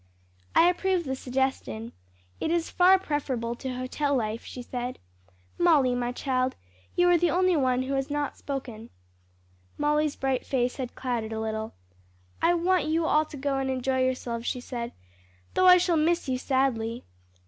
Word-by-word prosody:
"I 340 Hz, -, +7 dB
approve 360 Hz, 0 st, +1 dB
the 265 Hz, -3 st, -3 dB
suggestion. 255 Hz, -, -2 dB, 0.5 s
It -, -, -1 dB
is 335 Hz, 0 st, 0 dB
far 370 Hz, +2 st, +6 dB
preferable 270 Hz, -9 st, -2 dB
to 260 Hz, -1 st, -5 dB
hotel 280 Hz, +3 st, -1 dB
life," 225 Hz, -2 st, -2 dB
she 250 Hz, -, -8 dB
said. 245 Hz, 0 st, -4 dB, 0.6 s
"Molly, 300 Hz, -8 st, +4 dB
my 245 Hz, 0 st, -1 dB
child, 255 Hz, 0 st, -1 dB, 0.4 s
you 355 Hz, 0 st, +4 dB
are 350 Hz, -1 st, +5 dB
the 345 Hz, 0 st, +3 dB
only 365 Hz, +1 st, +3 dB
one 255 Hz, -3 st, +2 dB
who 270 Hz, +1 st, -3 dB
has 270 Hz, +1 st, -1 dB
not 290 Hz, -1 st, -2 dB
spoken." 245 Hz, -5 st, -6 dB, 0.9 s
Molly's 300 Hz, 0 st, +1 dB
bright 265 Hz, -1 st, -1 dB
face 250 Hz, -2 st, -1 dB
had 255 Hz, -3 st, -5 dB
clouded 235 Hz, -4 st, -3 dB
a 220 Hz, -, -3 dB
little. 220 Hz, 0 st, -3 dB, 0.7 s
"I 345 Hz, +1 st, +4 dB
want 360 Hz, +1 st, +2 dB
you 320 Hz, +1 st, +1 dB
all 310 Hz, 0 st, +3 dB
to 300 Hz, -, -10 dB
go 275 Hz, 0 st, -1 dB
and 265 Hz, 0 st, -1 dB
enjoy 260 Hz, 0 st, 0 dB
yourselves," 240 Hz, -2 st, -2 dB
she 250 Hz, -, -1 dB
said, 240 Hz, -1 st, -5 dB, 0.6 s
"though 370 Hz, -, +4 dB
I 360 Hz, 0 st, +9 dB
shall 350 Hz, -2 st, +2 dB
miss 335 Hz, +1 st, +1 dB
you 255 Hz, -1 st, -1 dB
sadly." 245 Hz, -4 st, 0 dB
265 Hz, 170 wpm, -27 LUFS, 245-310 Hz, 0.9 s, I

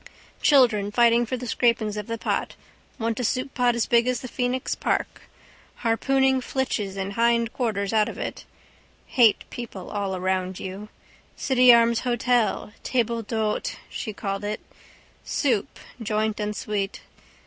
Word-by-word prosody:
Children 235 Hz, -8 st, +4 dB
fighting 235 Hz, +1 st, +4 dB
for 255 Hz, -, -2 dB
the 250 Hz, -, -6 dB
scrapings 230 Hz, -3 st, +1 dB
of 210 Hz, -1 st, -5 dB
the 230 Hz, 0 st, -3 dB
pot. -, -, -2 dB, 0.4 s
Want 230 Hz, -1 st, -2 dB
a -, -, -1 dB
souppot 250 Hz, 0 st, +1 dB
as 235 Hz, -, +1 dB
big 235 Hz, 0 st, +3 dB
as 250 Hz, -1 st, 0 dB
the 255 Hz, -, -6 dB
Phoenix 250 Hz, +1 st, -1 dB
park. -, -, -2 dB, 0.5 s
Harpooning 265 Hz, +3 st, +2 dB
flitches 220 Hz, -7 st, -2 dB
and 195 Hz, +1 st, -3 dB
hindquarters 230 Hz, -2 st, +1 dB
out 215 Hz, -1 st, +3 dB
of -, -, -8 dB
it. -, -, -5 dB, 0.6 s
Hate 235 Hz, -5 st, +4 dB
people 220 Hz, -6 st, -7 dB
all 195 Hz, -2 st, -2 dB
round 185 Hz, 0 st, -1 dB
you. 195 Hz, +3 st, -7 dB, 0.5 s
City 255 Hz, -2 st, +5 dB
Arms 235 Hz, -1 st, +5 dB
hotel 240 Hz, -3 st, 0 dB
table 235 Hz, -2 st, 0 dB
d'hôte 220 Hz, -1 st, -2 dB, 0.2 s
she 220 Hz, -, -4 dB
called 195 Hz, -1 st, -4 dB
it. 210 Hz, +1 st, -3 dB, 0.6 s
Soup, 240 Hz, -9 st, 0 dB, 0.2 s
joint 215 Hz, 0 st, -1 dB
and 210 Hz, 0 st, -2 dB
sweet. 205 Hz, -2 st, -3 dB
230 Hz, 140 wpm, -25 LUFS, 210-245 Hz, 0.6 s, City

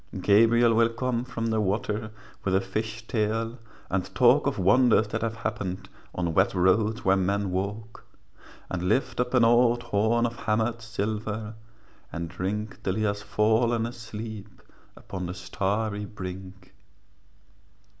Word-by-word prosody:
Gabriel 115 Hz, +4 st, +5 dB
will 115 Hz, +1 st, +4 dB
come 120 Hz, +1 st, -2 dB
from 115 Hz, -2 st, -4 dB
the 110 Hz, -1 st, +1 dB
water 105 Hz, +2 st, -1 dB, 0.3 s
With 95 Hz, -1 st, +1 dB
a -, -, +5 dB
fish 110 Hz, +4 st, -4 dB
tail, 115 Hz, +1 st, -1 dB, 0.3 s
and 95 Hz, -1 st, -3 dB
talk -, -, +5 dB
Of -, -, -1 dB
wonders 110 Hz, +3 st, +4 dB
that -, -, -3 dB
have 115 Hz, 0 st, -2 dB
happened 100 Hz, -4 st, -4 dB, 0.3 s
On 85 Hz, -2 st, -1 dB
wet 95 Hz, +3 st, +2 dB
roads 105 Hz, +6 st, +2 dB
where 95 Hz, 0 st, +5 dB
men 100 Hz, +1 st, 0 dB
walk, 100 Hz, +4 st, -4 dB, 0.7 s
And 90 Hz, 0 st, -1 dB
lift 130 Hz, +1 st, 0 dB
up 125 Hz, +1 st, 0 dB
an 125 Hz, -, +5 dB
old 120 Hz, +1 st, +4 dB
horn 110 Hz, +4 st, +1 dB
Of 120 Hz, 0 st, -3 dB
hammered 115 Hz, +2 st, 0 dB
silver, 110 Hz, -1 st, -3 dB, 0.6 s
and 85 Hz, -1 st, -4 dB
drink 100 Hz, +4 st, -4 dB
Till 95 Hz, -, -1 dB
he 110 Hz, -, -1 dB
has 100 Hz, -1 st, -1 dB
fallen 110 Hz, +2 st, +2 dB
asleep 110 Hz, -3 st, -8 dB, 0.3 s
Upon 90 Hz, -2 st, -6 dB
the 90 Hz, -, -5 dB
starry 100 Hz, +4 st, -2 dB
brink. 95 Hz, -1 st, -9 dB
110 Hz, 145 wpm, -26 LUFS, 95-115 Hz, 0.7 s, Gabriel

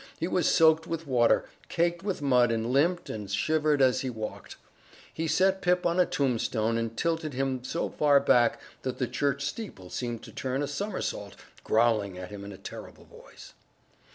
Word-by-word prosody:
He 165 Hz, -, -1 dB
was 180 Hz, -1 st, +1 dB
soaked 160 Hz, -1 st, +4 dB
with 165 Hz, 0 st, -4 dB
water, 120 Hz, -4 st, +3 dB, 0.2 s
caked 170 Hz, 0 st, 0 dB
with 190 Hz, -6 st, -3 dB
mud 125 Hz, -4 st, +4 dB
and 115 Hz, +2 st, -1 dB
limped 170 Hz, +6 st, +2 dB
and 105 Hz, -2 st, -6 dB
shivered 150 Hz, +7 st, +2 dB
as 130 Hz, -1 st, +3 dB
he 130 Hz, -, -2 dB
walked. 110 Hz, -3 st, -7 dB, 0.6 s
He 165 Hz, +1 st, -2 dB
set 190 Hz, +3 st, +2 dB
Pip 180 Hz, -1 st, +1 dB
on 170 Hz, +1 st, +1 dB
a 180 Hz, -, +4 dB
tombstone 115 Hz, -4 st, 0 dB
and 115 Hz, -1 st, -3 dB
tilted 160 Hz, -4 st, -1 dB
him 130 Hz, -1 st, -1 dB
so 165 Hz, +6 st, -2 dB
far 145 Hz, -2 st, +3 dB
back 120 Hz, -4 st, +3 dB, 0.2 s
that 130 Hz, -1 st, -4 dB
the 130 Hz, -, 0 dB
church 140 Hz, +1 st, -1 dB
steeple 150 Hz, -, -6 dB
seemed 120 Hz, -2 st, -4 dB
to -, -, -10 dB
turn 130 Hz, +2 st, -2 dB
a -, -, -2 dB
somersault, 200 Hz, +8 st, -4 dB, 0.3 s
growling 110 Hz, -4 st, +2 dB
at 90 Hz, +1 st, -8 dB
him 100 Hz, -1 st, -8 dB
in 100 Hz, -, -8 dB
a 95 Hz, -, -10 dB
terrible 95 Hz, -, -10 dB
voice. -, -, -15 dB
135 Hz, 180 wpm, -28 LUFS, 115-165 Hz, 0.6 s, soaked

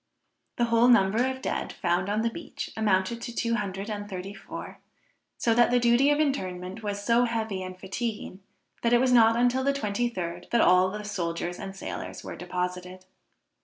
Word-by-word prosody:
The 240 Hz, -, +2 dB
whole 230 Hz, +1 st, +4 dB
number 230 Hz, +1 st, +4 dB
of 260 Hz, 0 st, -4 dB
dead -, -, -2 dB
found 180 Hz, 0 st, 0 dB
on 210 Hz, +2 st, +1 dB
the 230 Hz, -, 0 dB
beach, 330 Hz, +2 st, -7 dB
amounted 210 Hz, +1 st, +1 dB
to 240 Hz, -, -6 dB
two 230 Hz, -1 st, 0 dB
hundred 200 Hz, -2 st, -3 dB
and 205 Hz, -1 st, -5 dB
thirty 190 Hz, +1 st, -6 dB
four; -, -, -9 dB, 0.6 s
so 230 Hz, -, +2 dB
that 240 Hz, +1 st, +5 dB
the 245 Hz, 0 st, +3 dB
duty 240 Hz, +4 st, +4 dB
of 295 Hz, 0 st, +3 dB
interment 185 Hz, -9 st, -2 dB
was 205 Hz, -1 st, -4 dB
so 235 Hz, +2 st, +4 dB
heavy 220 Hz, -5 st, -2 dB
and 185 Hz, 0 st, -7 dB
fatiguing, 210 Hz, 0 st, -4 dB, 0.4 s
that 235 Hz, 0 st, +2 dB
it 240 Hz, -, +6 dB
was 255 Hz, 0 st, +2 dB
not 230 Hz, -2 st, +6 dB
until 245 Hz, +2 st, +2 dB
the 280 Hz, +1 st, +2 dB
twenty 240 Hz, -2 st, -1 dB
third 175 Hz, -4 st, -5 dB
that 235 Hz, -, +2 dB
all 185 Hz, -2 st, +5 dB
the 210 Hz, +2 st, -6 dB
soldiers 175 Hz, -3 st, -3 dB
and 195 Hz, -1 st, -7 dB
sailors -, -, -6 dB
were -, -, -7 dB
deposited. 180 Hz, +1 st, -4 dB
210 Hz, 190 wpm, -27 LUFS, 185-240 Hz, 0.6 s, it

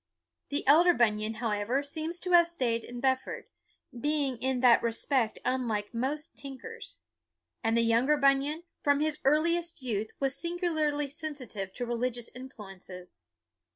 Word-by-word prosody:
The 285 Hz, -, -2 dB
elder 340 Hz, +5 st, +7 dB
Bunyan, 215 Hz, -1 st, +1 dB
however, 225 Hz, +4 st, 0 dB
seems 315 Hz, +4 st, -3 dB
to 360 Hz, -, -2 dB
have 345 Hz, -1 st, +7 dB
stayed 245 Hz, -9 st, 0 dB
in 245 Hz, 0 st, -8 dB
Bedford; 260 Hz, -1 st, 0 dB, 0.5 s
being 280 Hz, 0 st, -1 dB
in 260 Hz, 0 st, 0 dB
that 245 Hz, -2 st, +6 dB
respect 235 Hz, 0 st, 0 dB
unlike 235 Hz, -5 st, -1 dB
most 275 Hz, +6 st, -3 dB
tinkers. 270 Hz, -, -8 dB, 0.6 s
And 225 Hz, +1 st, +2 dB
the -, -, +4 dB
younger 235 Hz, +6 st, +3 dB
Bunyan, 280 Hz, +3 st, +2 dB, 0.2 s
from 285 Hz, 0 st, +3 dB
his 305 Hz, 0 st, 0 dB
earliest 330 Hz, +2 st, +2 dB
youth, 220 Hz, -3 st, -1 dB
was 270 Hz, -1 st, +1 dB
singularly 315 Hz, -3 st, 0 dB
sensitive 275 Hz, -, -5 dB
to 245 Hz, -, -3 dB
religious 240 Hz, 0 st, -2 dB
influences. 195 Hz, -, -10 dB
265 Hz, 135 wpm, -30 LUFS, 230-300 Hz, 0.6 s, elder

